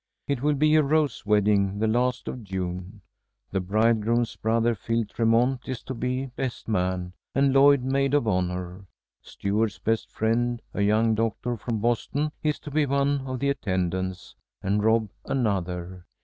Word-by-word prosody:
It 140 -4 -1
will 150 +1 +2
be 155 +2 +3
a 155 - +6
rose 145 -6 0
wedding, 100 -1 +3
the 110 - +1
last 125 +3 0
of 125 - -5
June. 95 +1 -5 0.5
The 95 - 0
bridegroom's 110 +4 +1
brother, 115 +1 +1
Phil 115 +2 -1
Tremont, 115 +5 +2
is 130 -3 -4
to 130 - -5
be 125 +2 -2
best 130 -3 -4
man, 90 -3 -1 0.2
and 135 0 +3
Lloyd 140 -1 +6
maid 135 +1 +1
of 145 -6 +2
honor. 90 0 -2 0.3
Stuart's 105 +2 -1
best 115 0 -1
friend, 120 +2 0
a - - -2
young 110 +2 +3
doctor 115 +2 -1
from 110 -1 -3
Boston, 140 +6 0
is 150 -1 0
to 145 - -8
be 150 0 +2
one 140 0 +1
of 130 0 -3
the 140 +3 0
attendants, 95 -6 -2 0.3
and 100 +2 +1
Rob 110 -2 +2
another. 90 -7 -2
115 Hz, 160 wpm, -26 LUFS, 100-130 Hz, 0.5 s, a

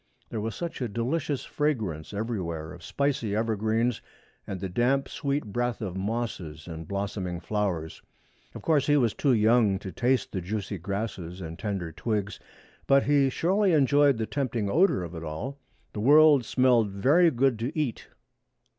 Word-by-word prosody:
There 110 - -3
was 110 0 -3
such 170 -5 -5
a 125 - 0
delicious 135 +6 -2
fragrance 110 - -2
everywhere 90 -7 -4
of 90 - -12
spicy 130 - -1
evergreens 110 +1 0 0.5
and 95 - -4
the 95 - -3
damp 125 +9 +1
sweet 145 -3 -2
breath 120 +3 -2
of 95 -6 -4
mosses 95 -7 -4
and 80 -2 -7
blossoming 100 -3 -3
flowers. 90 -6 -2 0.5
Of - - -8
course 150 -4 +2
he 145 0 +4
was 120 -6 +2
too 140 -3 +2
young 110 -2 +4
to 95 -1 -7
taste 125 +1 0
the 95 - -3
juicy 100 +1 -4
grasses 95 -2 -4
and 80 -2 -7
tender 95 -6 -3
twigs, 105 +4 -3 0.5
but 135 0 +5
he 140 -2 +3
surely 190 +7 +2
enjoyed 145 -2 +4
the 110 - -1
tempting 115 -6 -2
odor 170 - +3
of 85 0 -7
it 85 -1 -7
all. 120 - -5 0.3
The - - -5
world 145 +2 +6
smelled 125 -3 +3
very 140 - +4
good 130 -4 +1
to 125 +8 -3
eat. 135 -7 -2
110 Hz, 165 wpm, -27 LUFS, 95-135 Hz, 0.5 s, world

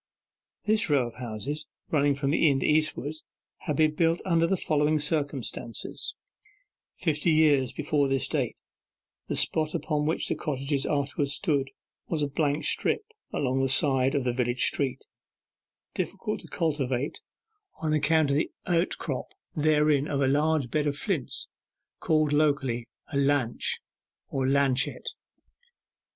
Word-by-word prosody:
This 215 -3 +2
row 140 -4 +3
of - - -16
houses, 125 +5 -5 0.2
running 145 -2 +3
from 140 0 -1
the 155 0 +4
inn 135 -1 +1
eastward, 155 -1 +1 0.5
had 150 - 0
been 155 +1 +3
built 165 +2 +2
under 165 -2 +3
the 190 +2 +1
following 150 -1 +2
circumstances: 145 -6 -2 0.8
Fifty 155 0 0
years 150 -5 +4
before 150 -1 0
this 135 -2 0
date, - - -1 0.7
the - - -2
spot 155 -1 +1
upon 150 -1 -1
which 160 - 0
the - - 0
cottages 140 -1 -2
afterwards 140 -1 0
stood 145 -6 0 0.4
was 155 -3 -1
a - - +1
blank 145 +1 0
strip, 440 - 0 0.2
along 130 -1 0
the 135 - +1
side 135 0 +4
of 140 - +1
the 125 -1 0
village 120 0 +1
street, 135 -2 0 0.9
difficult - - -3
to - - -12
cultivate, 140 -4 -1 0.6
on 155 -1 0
account 155 -1 +3
of 140 - +2
the 155 - 0 0.2
outcrop 175 0 -1 0.3
thereon 150 -2 +3
of 140 - -1
a 135 - +3
large 145 -1 +1
bed 150 -1 +1
of 145 -1 -1
flints 160 - -2 0.5
called 155 -2 +2
locally 140 -6 +1 0.3
a - - +1
'lanch' 140 -4 +2 0.5
or 135 -1 -1
'lanchet. 135 -1 +1
145 Hz, 140 wpm, -27 LUFS, 135-155 Hz, 0.9 s, the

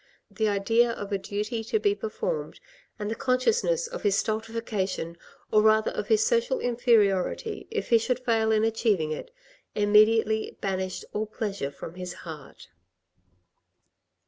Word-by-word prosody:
The 220 -2 0
idea 225 +4 +3
of 205 -3 -5
a 200 - 0
duty 210 +3 -3
to 440 - 0
be 410 -1 +2
performed 465 +3 -4 0.4
and 210 -1 -3
the - - +1
consciousness 450 - +1
of 480 - -6
his 200 -1 +2
stultification, 215 -6 -2 0.4
or 215 - +5
rather 220 0 +4
of - - -4
his 440 0 +3
social 480 +1 +1
inferiority, 235 - +1
if 450 -1 -3
he 230 - +6
should 245 +2 0
fail 225 -2 +2
in 215 0 +3
acheiving 215 -8 +1
it, 155 - -5 0.5
immediately 215 +1 +3
banished 190 -1 -3
all 215 +1 -1
pleasure 205 - -3
from 145 +3 -9
his 180 0 -6
heart. 150 - -10
220 Hz, 145 wpm, -27 LUFS, 200-245 Hz, 0.5 s, he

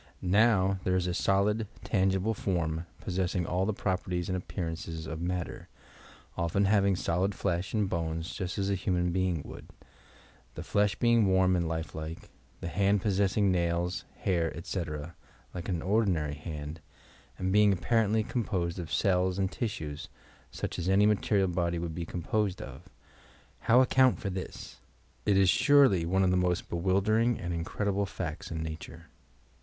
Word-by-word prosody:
Now, 95 0 +3
there 90 - +1
is 90 -1 +1
a 90 - -1
solid, 100 +4 +1 0.2
tangible 95 +1 +1
form 85 -5 -2
possessing 90 -1 -1
all 90 +3 0
the - - +2
properties 90 -3 -2
and 95 - 0
appearances 80 -3 -5
of 80 +1 -5
matter, 90 0 -3 0.7
often 85 +4 +1
having 100 -1 +3
solid 90 +3 0
3esh 90 +2 -2
and 105 -2 +2
bones 80 -1 -3
just 90 -1 -4
as 100 0 0
a - - +2
human 90 -2 0
being 90 -4 0
would, - - -10 0.5
— - - -28
the - - -6
flesh 105 0 +1
being 115 -3 +3
warm 95 -1 +3
and 85 -2 0
life 80 -1 -3
lilce, 80 +1 -5 0.4
the - - -4
hand 100 +3 +1
possessing 100 0 +2
nails, 85 0 0
hair, 85 -3 0
etc., 85 -2 -4 0.4
like 90 +2 -5
an 85 -3 -2
ordinary 95 -8 +1
hand, 75 0 -7 0.6
and 95 0 -1
being 105 0 +6
apparently 110 +3 +2
composed 95 -7 -2
of 80 -4 -6
cells 90 +3 +2
and 95 -1 0
tia 120 - -2
sues, 75 -5 -6 0.4
such - - -5
as 90 +1 -1
any 100 +2 +5
material 105 -2 +2
body 85 -1 -1
would 85 -1 -3
be 85 +1 -4
composed 95 +2 -1
of! 65 0 -10 0.7
How 120 +3 +5
account 130 0 +4
for 100 - -3
this 95 0 -7
I - - -11
It 100 - +4
is 95 -2 +5
surely 135 - +5
one 95 +2 +2
of 90 - +3
the 90 - +2
most 90 -1 0
be - - -1
wildering 105 +6 +2
and 85 0 -3
incredible 100 +4 -1
facts 90 -6 -5
in 80 -1 -3
Nature. 80 0 -8
95 Hz, 165 wpm, -29 LUFS, 85-100 Hz, 0.7 s, being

